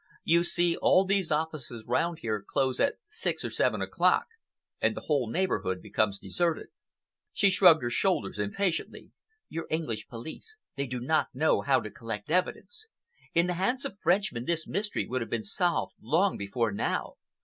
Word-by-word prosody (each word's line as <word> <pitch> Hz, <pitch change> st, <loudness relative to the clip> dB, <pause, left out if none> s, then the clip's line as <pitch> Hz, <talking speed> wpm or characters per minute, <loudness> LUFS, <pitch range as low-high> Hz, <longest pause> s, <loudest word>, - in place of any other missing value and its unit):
You 170 Hz, +1 st, +4 dB
see, 175 Hz, -1 st, +1 dB
all 190 Hz, +1 st, +4 dB
these 195 Hz, -3 st, +1 dB
offices 150 Hz, -7 st, -2 dB
round 165 Hz, +7 st, +1 dB
here 110 Hz, -3 st, -1 dB
close 130 Hz, +5 st, 0 dB
at 280 Hz, -, +2 dB
six 430 Hz, -, -2 dB
or -, -, -3 dB
seven -, -, +1 dB
o'clock, -, -, +2 dB, 0.6 s
and -, -, +2 dB
the -, -, -4 dB
whole 140 Hz, -7 st, 0 dB
neighborhood 115 Hz, -, 0 dB
becomes 100 Hz, 0 st, 0 dB
deserted." 160 Hz, -, -1 dB, 0.6 s
She 200 Hz, -, +4 dB
shrugged 175 Hz, -6 st, +6 dB
her 120 Hz, -, -1 dB
shoulders 120 Hz, -, 0 dB
impatiently. 165 Hz, -, -2 dB, 0.4 s
"Your 165 Hz, -, -5 dB
English 120 Hz, -10 st, -2 dB
police, 160 Hz, -, -8 dB, 0.2 s
they 140 Hz, 0 st, -2 dB
do 125 Hz, 0 st, -4 dB
not 155 Hz, +6 st, +1 dB
know 155 Hz, +4 st, +3 dB
how 135 Hz, -1 st, +3 dB
to 110 Hz, -, -7 dB
collect 110 Hz, +2 st, -6 dB
evidence. 190 Hz, -, -1 dB, 0.5 s
In 170 Hz, +1 st, +5 dB
the 180 Hz, -, 0 dB
hands 200 Hz, +9 st, 0 dB
of -, -, -4 dB
Frenchmen, 175 Hz, -, +1 dB
this 165 Hz, 0 st, -1 dB
mystery 205 Hz, +3 st, -1 dB
would 130 Hz, 0 st, -2 dB
have 115 Hz, -, -4 dB
been -, -, -2 dB
solved 180 Hz, -4 st, 0 dB
long 170 Hz, -, +2 dB
before 105 Hz, +3 st, -1 dB
now. 100 Hz, -, -2 dB
160 Hz, 170 wpm, -29 LUFS, 120-185 Hz, 0.6 s, shrugged